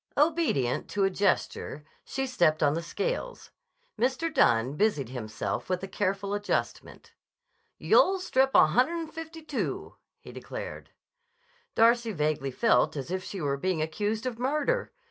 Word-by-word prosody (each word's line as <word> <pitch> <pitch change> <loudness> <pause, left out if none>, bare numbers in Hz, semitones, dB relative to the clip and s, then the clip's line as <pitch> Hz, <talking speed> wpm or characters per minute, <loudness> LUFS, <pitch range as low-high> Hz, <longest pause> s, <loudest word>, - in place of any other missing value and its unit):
Obedient 295 - +1
to 205 - 0
a 195 - +3
gesture 185 -6 -1 0.2
she 270 0 -3
stepped 170 -12 +2
on 145 -1 +4
the 165 - -2
scales. 485 - -4 0.5
Mr. 265 +6 0
Dunne 120 - +3
busied 150 - +1
himself 110 +2 -4
with 185 0 -1
a - - -3
careful 195 +1 -2
adjustment. 205 0 -3 0.6
"You'll 385 -6 +4
strip 265 -7 +2
a - - +8
hunner'n 310 - +1
fifty 325 0 -8
two," 300 -3 -4 0.2
he - - -12
declared. - - -7 0.9
Darcy 230 0 +4
vaguely 150 -4 -1
felt 225 - +2
as 140 +5 -5
if 185 0 -2
she 195 -1 -6
were 140 -2 0
being 185 +3 -1
accused 205 +9 -2
of 240 -2 -3
murder. 300 - 0
205 Hz, 145 wpm, -28 LUFS, -, 0.9 s, a